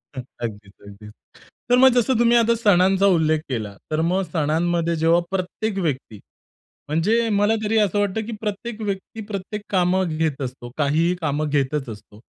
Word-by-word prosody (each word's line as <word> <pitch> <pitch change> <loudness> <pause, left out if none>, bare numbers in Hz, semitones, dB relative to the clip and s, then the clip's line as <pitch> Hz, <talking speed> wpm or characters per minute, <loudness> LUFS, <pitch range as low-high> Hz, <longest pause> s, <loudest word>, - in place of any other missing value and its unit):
हं. 130 - -4 0.2
अगदीच, 105 -3 -6 0.2
अगदीच. 105 +1 -12 0.6
तर 245 - +5
मग 265 +1 +7
जसं 245 0 +2
तुम्ही 240 0 +5
आता 235 0 +3
सणांचा 195 -3 +3
उल्लेख 160 -5 +3
केला, 110 -6 -4 0.2
तर 155 +1 +1
मग 180 +4 +1
सणांमध्ये 170 +1 0
जेव्हा 165 +2 +3
प्रत्येक 195 +3 -3
व्यक्ती, 135 - -3 0.7
म्हणजे 205 +10 +1
मला 205 +1 +2
तरी 220 +1 +1
असं 205 -2 +2
वाटतं, 205 +2 -1
की 235 - -6
प्रत्येक 220 +2 -5
व्यक्ती 205 +1 -5
प्रत्येक 205 0 -5
कामं 180 -3 +1
घेत 155 -3 -1
असतो, 125 -2 -6
काहीही 155 +4 +1
कामं 150 -1 -1
घेतच 140 -1 -1
असतो. 105 -1 -11
175 Hz, 160 wpm, -22 LUFS, 150-210 Hz, 0.7 s, मग